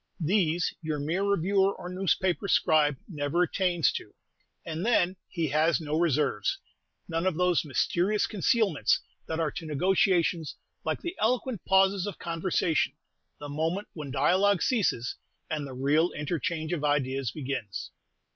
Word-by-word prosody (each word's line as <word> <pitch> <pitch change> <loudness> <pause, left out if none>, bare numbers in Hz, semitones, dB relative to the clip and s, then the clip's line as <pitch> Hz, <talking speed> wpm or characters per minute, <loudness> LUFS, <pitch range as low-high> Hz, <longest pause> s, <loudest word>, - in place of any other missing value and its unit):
These, 175 -1 +1
your 155 -2 -2
mere 160 +6 -1
reviewer 200 0 +2
or - - -8
newspaper 185 -1 0
scribe 150 -6 +3
never 155 0 0
attains 175 -4 +1
to; - - -7 0.5
and 165 +1 -4
then 190 -5 +2
he 165 -4 -2
has 155 0 +2
no 150 -1 -3
reserves, 150 - +1 0.5
none 165 +2 -1
of 185 - +1
those 180 -1 +2
mysterious 175 +7 +1
concealments 205 -4 +2 0.3
that 160 0 -3
are 160 -2 0
to 165 - -7
negotiations 175 0 +1 0.3
like - - -2
the 345 +1 -4
eloquent 240 -2 0
pauses 190 0 +3
of 200 - -5
conversation: 165 -1 0 0.5
the 145 - -7
moment 160 +7 -2
when 150 -4 -7
dialogue 180 +8 +3
ceases, 185 - 0 0.3
and 150 -2 -2
the 135 - -8
real 145 +6 +2
interchange 160 +2 -2
of 155 -4 -2
ideas 135 -3 0
begins. 130 -5 -5
165 Hz, 140 wpm, -28 LUFS, 150-190 Hz, 0.5 s, scribe